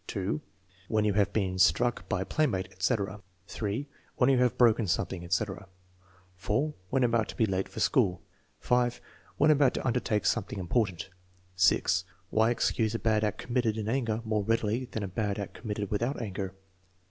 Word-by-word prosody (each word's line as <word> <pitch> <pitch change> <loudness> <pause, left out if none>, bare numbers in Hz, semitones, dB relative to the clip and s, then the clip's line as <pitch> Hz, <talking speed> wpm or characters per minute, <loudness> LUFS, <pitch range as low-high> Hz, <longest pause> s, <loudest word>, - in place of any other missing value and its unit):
(2) 100 +9 -2 0.5
When 110 -1 +1
you 105 - +2
have 100 0 +2
been 95 -3 -1
struck 95 +3 +2
by 95 -2 0
a - - -12
playmate, 115 -12 0
etc. 100 +1 -1 0.2
(3) 110 +7 -3 0.3
When 125 +2 +4
you 130 - +3
have 125 -1 +2
broken 115 -3 +4
something, 85 +1 -1
etc. 95 +2 -2 0.7
(4) 145 +10 0 0.2
When 135 -1 +2
about 115 -2 +2
to - - -7
be 110 - +4
late 95 -2 -1
for - - -8
school. 90 -1 +2 0.4
(5) 120 -1 +1 0.4
When 150 +1 +5
about 140 -3 +4
to - - -3
undertake 120 -4 0
something 105 -3 0
important. 95 -2 -1 0.4
(6) 90 -1 +3 0.3
Why 110 +1 +3
excuse 115 -2 0
a - - +2
bad 110 -1 +1
act 105 -2 0
committed 120 -3 -1
in 105 -1 -3
anger 115 -2 0
more 110 -2 0
readily 115 +3 0
than 110 -3 -5
a - - -2
bad 100 +2 -2
act 100 - -5
committed 105 -3 -4
without 120 +7 -1
anger. 95 -4 -4
110 Hz, 175 wpm, -29 LUFS, 100-120 Hz, 0.7 s, When